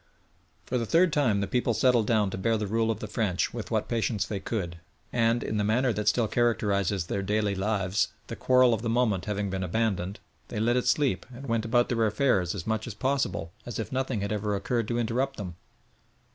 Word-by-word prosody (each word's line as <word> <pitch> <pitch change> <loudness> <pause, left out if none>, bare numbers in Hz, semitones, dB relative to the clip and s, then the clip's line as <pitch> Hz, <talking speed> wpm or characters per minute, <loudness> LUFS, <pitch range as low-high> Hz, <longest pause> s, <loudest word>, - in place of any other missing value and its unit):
For 125 - -1
the 115 - -2
third 170 - +4
time 115 -9 +2
the 100 - -1
people 120 0 0
settled 125 -5 +3
down 105 -4 +2
to - - -4
bear 115 +3 +1
the 105 - -2
rule 115 +2 0
of 110 -2 -2
the 110 - -4
French 105 -4 -1
with - - -5
what - - 0
patience 110 -3 0
they 100 - -4
could, 90 -6 -4 0.3
and, 115 0 +2
in 110 - -2
the 105 - +1
manner 120 +4 +2
that 105 +1 -3
still 110 +1 +3
characterises 100 -5 +1
their 100 - -2
daily 105 +1 0
lives, 100 0 0 0.2
the - - -6
quarrel 130 -1 +4
of 110 - -1
the 115 - -2
moment 115 -6 +1
having 105 -2 -2
been 95 0 -2
abandoned, 95 0 -1 0.3
they 105 - -4
let 120 +3 +2
it 125 0 0
sleep 125 -8 +2
and 130 +3 -9
went 115 -3 0
about 120 +1 +3
their 115 -2 +1
affairs 100 -7 +1
as 90 - -5
much 110 0 -1
as 115 - -6
possible 105 -10 -1
as 120 -4 -6
if 110 - -4
nothing 130 -4 -1
had 100 0 -2
ever 105 -1 -1
occurred 115 +3 -1
to 120 - -1
interrupt 125 +4 -1
them. 90 -5 -6
110 Hz, 220 wpm, -28 LUFS, 100-120 Hz, 0.3 s, third